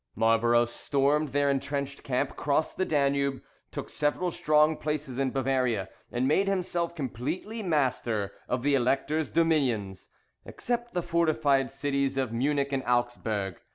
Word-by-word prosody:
Marlborough 115 +2 +3
stormed 140 +5 0
their 145 +1 +1
entrenched 140 0 -2
camp, 135 +1 -1
crossed 150 +2 0
the 185 - 0
Danube, 140 -3 +1 0.3
took - - -6
several 155 +4 -1
strong 155 0 +3
places 150 -4 -3
in 135 -1 +1
Bavaria, 125 -7 0 0.2
and 125 +2 0
made 195 +7 +3
himself 175 -3 -1
completely 155 - -4
master 125 - 0 0.2
of 125 -1 -1
the 145 0 +2
Elector's 140 +4 +1
dominions, 125 - 0 0.3
except 240 -2 -4
the 175 - 0
fortified 155 -6 +2
cities 140 0 -1
of 130 -4 -1
Munich 140 +3 0
and 135 - +1
Augsburg. 115 -6 -1
140 Hz, 135 wpm, -28 LUFS, 125-150 Hz, 0.3 s, Marlborough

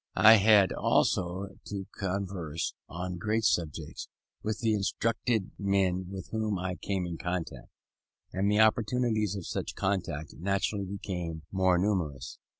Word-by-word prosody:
I 110 +1 +9
had 100 -2 +6
now - - -4
also 90 +2 +2
begun 100 - -10
to 100 -2 -5
converse, 95 -5 -3 0.2
on 90 +1 -4
general 110 +3 0
subjects, 85 -8 -1 0.3
with 110 -1 -2
the 110 -2 +2
instructed 110 +1 0
men 95 -2 +1
with 95 -1 -7
whom 110 -2 -1
I 90 0 -2
came 95 +1 -2
in 85 -2 -5
contact: 90 -2 -4 0.6
and 95 +2 +1
the 105 +1 +4
opportunities 110 -2 +2
of 95 -4 -5
such - - -4
contact 90 -6 -2
naturally 100 +2 0
became 90 -4 -5
more 95 -2 +3
numerous. 90 -8 -1
95 Hz, 145 wpm, -29 LUFS, 90-105 Hz, 0.6 s, I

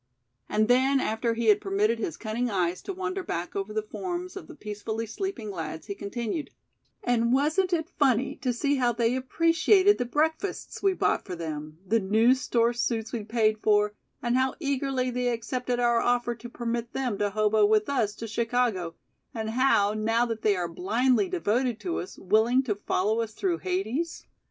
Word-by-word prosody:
And 215 0 +2
then 260 +3 +4
after 230 0 0
he 235 0 -2
had 210 -1 +5
permitted 210 +3 +1
his 165 -8 -3
cunning 235 +3 -2
eyes 180 -3 0
to - - -5
wander 380 +1 -3
back 175 - -4
over 195 +1 -3
the 215 0 -1
forms 360 - -5
of 390 - -8
the - - -11
peacefully 215 -1 -4
sleeping 230 - -4
lads 160 -3 -5
he - - -4
continued: 230 +8 -4 0.5
"And 235 -1 +2
wasn't 310 +8 +2
it 330 -1 -1
funny 260 -3 +2
to 255 -1 -1
see 280 +4 0
how 245 -2 +2
they 235 +1 +1
appreciated 330 +9 +3
the 245 - 0
breakfasts 320 +9 -1
we 390 -1 +3
bought - - +1
for 185 - -6
them, 155 -2 -6
the 225 +4 +2
new 220 +5 +4
store 240 -2 +1
suits 230 -1 -2
we 230 -3 -2
paid 215 -1 +1
for, 210 -1 +3 0.3
and 240 0 +1
how 260 0 +1
eagerly 270 -3 -1
they 250 0 -1
accepted 245 +1 -2
our 240 -1 +3
offer 240 0 +1
to 240 +1 -10
permit 235 0 -3
them 250 -6 -2
to 205 - +1
hobo 215 +1 +2
with 215 0 +3
us 225 -7 0
to 225 - -6
Chicago, 225 -6 0 0.4
and 220 -1 -3
how 225 -5 +3
now 225 +2 +1
they 220 -3 0
are 175 -2 -1
blindly 240 - +1
devoted 250 - 0
to 350 -2 -2
us, 180 - -7
willing 225 +7 +3
to 235 -5 0
follow 205 +2 0
us 220 -1 -4
through 365 -4 -1
Hades?" 220 - -2
235 Hz, 185 wpm, -27 LUFS, 215-260 Hz, 0.5 s, had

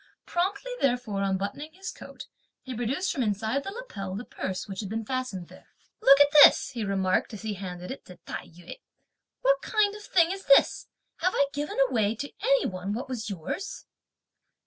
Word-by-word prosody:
Promptly 390 +8 -1
therefore 245 -6 0
unbuttoning 200 +11 -2
his 380 +2 -6
coat, - - -11 0.4
he 260 - -6
produced 260 +11 -1
from 270 - -2
inside 220 +5 0
the - - -5
lapel 200 - -6
the 225 +5 -5
purse, 185 -1 -4
which 195 -2 -6
had 200 - -4
been 225 +1 -3
fastened 255 -8 -3
there. - - -16 0.3
"Look 275 +1 +7
at 285 0 +6
this!" - - +6
he 235 -3 -4
remarked 195 +1 0
as 205 - -10
he 215 -1 -2
handed 180 -1 -7
it 265 - -8
to 180 - -12
Tai - - -6
yü; 175 - -12 0.6
"what - - +3
kind 425 -2 +2
of 420 - -9
thing 350 -4 +3
is 390 0 -6
this! 275 - +5 0.3
have 365 +3 +1
I 280 - +4
given 295 +1 -4
away 225 -4 +1
to 285 +5 -6
any - - +3
one 185 +1 -3
what 245 +4 -5
was 235 -4 -4
yours?" 195 - -5
245 Hz, 190 wpm, -27 LUFS, -, 0.6 s, Look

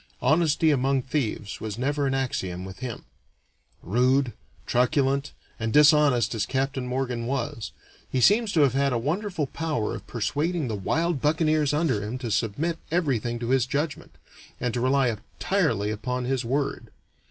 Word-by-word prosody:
Honesty 155 +3 +3
among 135 -1 +1
thieves 120 -7 -3
was 110 -1 -4
never 140 +3 0
an 135 - 0
axiom 95 -9 -2
with 95 -1 -9
him. 125 -3 -5 0.8
Rude, 125 +5 +2 0.3
truculent, 135 +2 +1 0.3
and 115 -1 -1
dishonest 150 -4 +5
as 110 -3 -1
Captain 135 -1 -1
Morgan 125 -2 -2
was, 120 -5 -3 0.4
he 130 - 0
seems 210 - +4
to 160 - +4
have 135 -4 +4
had 140 0 +2
a - - +1
wonderful 165 - -1
power 150 -7 -2
of 105 -2 -8
persuading 145 +7 -1
the 110 - -2
wild 160 - 0
buccaneers 155 -1 +2
under 145 -8 +1
him 105 +5 -4
to 120 -3 -4
submit 145 +11 -1
everything 130 -9 0
to 120 0 -4
his 130 -1 +3
judgment, 145 +3 -3 0.4
and 125 -2 -1
to 120 - -1
rely 130 0 +3 0.3
entirely 135 - +1
upon 125 +4 -3
his 130 0 0
word. 135 +4 -2
130 Hz, 155 wpm, -26 LUFS, 120-150 Hz, 0.8 s, dishonest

